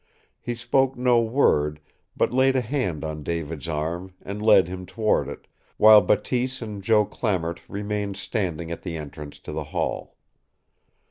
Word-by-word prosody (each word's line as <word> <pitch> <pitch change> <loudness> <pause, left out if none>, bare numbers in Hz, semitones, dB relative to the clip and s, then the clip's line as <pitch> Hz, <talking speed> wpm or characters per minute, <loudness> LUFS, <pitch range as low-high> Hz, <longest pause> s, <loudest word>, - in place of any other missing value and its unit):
He 120 - -4
spoke 130 +2 +1
no 125 -1 +4
word, 75 - +2 0.4
but - - +1
laid 130 +1 +3
a 130 - +3
hand 110 - -2
on 75 -1 -5
David's 80 -1 -4
arm 85 +4 -3
and 100 +2 -6
led 105 -4 +6
him 90 +1 -6
toward 110 -2 +1
it, - - -9 0.3
while 110 0 +9
Bateese 125 +7 0
and 105 -4 -6
Joe 105 +1 +3
Clamart 90 -8 -2
remained 105 -1 -3
standing 85 -6 -3
at 85 - -5
the 85 -3 -5
entrance 75 -1 -8
to - - -8
the - - -4
hall. - - -3
100 Hz, 155 wpm, -24 LUFS, 85-120 Hz, 0.4 s, while